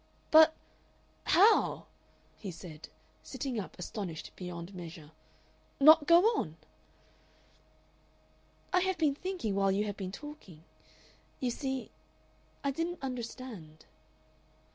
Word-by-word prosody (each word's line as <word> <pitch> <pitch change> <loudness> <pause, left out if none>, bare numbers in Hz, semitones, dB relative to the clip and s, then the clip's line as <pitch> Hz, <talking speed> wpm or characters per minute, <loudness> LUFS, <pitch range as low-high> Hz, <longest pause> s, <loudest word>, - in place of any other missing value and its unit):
"But, 315 0 +8 0.7
how," 410 +6 +4 0.5
he 200 - -7
said, 165 -3 -10 0.3
sitting 260 -5 -4
up 195 - -7
astonished 180 -3 -6
beyond 175 0 -7
measure, 165 -4 -9 0.7
"not 305 +1 +8
go 340 +1 +7 0.2
on?" 160 0 -5 2.2
"I 365 - +5
have 375 0 0
been 310 -4 +2
thinking 350 - -3
while 195 0 +2
you 200 +2 +1
have 205 -1 -4
been 185 -1 -5
talking. 200 - -11 0.8
You 250 -2 0
see 265 0 -4 0.7
I 280 - +1
didn't 335 +5 -3
understand." 235 -10 -7
235 Hz, 105 wpm, -31 LUFS, -, 2.2 s, But